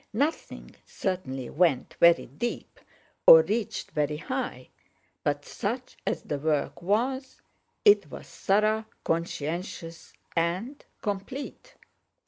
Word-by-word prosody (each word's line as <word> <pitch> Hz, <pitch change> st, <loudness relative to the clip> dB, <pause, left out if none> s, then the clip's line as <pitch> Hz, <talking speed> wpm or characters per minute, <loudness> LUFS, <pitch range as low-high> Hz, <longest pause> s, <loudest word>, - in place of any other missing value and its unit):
Nothing 285 Hz, +9 st, -2 dB
certainly 135 Hz, -10 st, -3 dB
went 155 Hz, -6 st, +2 dB
very 170 Hz, 0 st, +6 dB
deep, 195 Hz, -, -5 dB, 0.5 s
or 485 Hz, -1 st, +11 dB
reached 220 Hz, -1 st, -2 dB
very 150 Hz, 0 st, 0 dB
high—but 245 Hz, -, -5 dB
such -, -, -4 dB
as -, -, -1 dB
the 145 Hz, -, -3 dB
work 150 Hz, +2 st, -1 dB
was, 250 Hz, +8 st, -1 dB, 0.4 s
it 415 Hz, 0 st, +6 dB
was -, -, -9 dB
thorough, 215 Hz, +2 st, +1 dB, 0.2 s
conscientious, 165 Hz, +1 st, -3 dB, 0.2 s
and 180 Hz, -, -1 dB, 0.2 s
complete. 260 Hz, -, -5 dB
190 Hz, 100 wpm, -27 LUFS, 160-240 Hz, 0.5 s, or